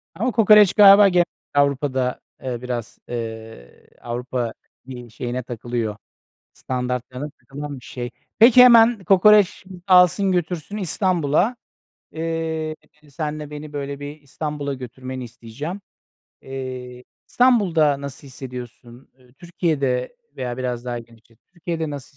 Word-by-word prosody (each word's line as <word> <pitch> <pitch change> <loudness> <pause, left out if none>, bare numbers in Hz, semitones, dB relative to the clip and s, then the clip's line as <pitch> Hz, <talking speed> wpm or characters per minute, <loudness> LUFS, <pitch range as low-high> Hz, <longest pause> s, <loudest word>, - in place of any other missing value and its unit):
Ama 240 +8 -1
kokoreç 210 -3 +6
galiba 200 -1 +8
ge 175 -1 +4 0.3
Avrupa'da, 140 -2 +1 0.2
eee, 125 -2 -4
biraz, 120 -2 -5
eee, 110 - -8
Avrupa, 120 0 -3 0.3
iii, 125 -3 -10
şeyine 120 +2 -4
takılıyor, 120 -2 -4 0.6
standartlarına 125 +2 -4
takılan 145 0 -8
bir 115 - -18
şey. 120 -1 -6 0.3
Peki, 240 +2 +8
hemen 230 -4 +6
kokoreç 200 +1 +5 0.2
alsın 185 +1 +5
götürsün 175 +2 -3
İstanbul'a. 185 - 0 0.6
Eee, 160 -1 -3 0.3
seninle 150 0 -5
beni 150 0 -9
böyle 140 0 -5
bir 145 +1 -8
İstanbul'a 145 0 -5
götürmeni 130 0 -7
isteyeceğim. 120 - -8 0.6
Eee, 130 -2 -7 0.2
İstanbul'da 175 - +3
nasıl 140 0 -8
hissediyorsun? 125 -1 -10
Iıı, 125 -1 -24
Türkiye'de 155 - -2 0.2
veya 125 -2 -4
biraz 125 -1 -4
daha 120 -1 -3
genişlet, 115 -1 -17
Türkiye'de 165 -3 -4
nasıl 145 0 -9
140 Hz, 115 wpm, -22 LUFS, 125-175 Hz, 0.6 s, galiba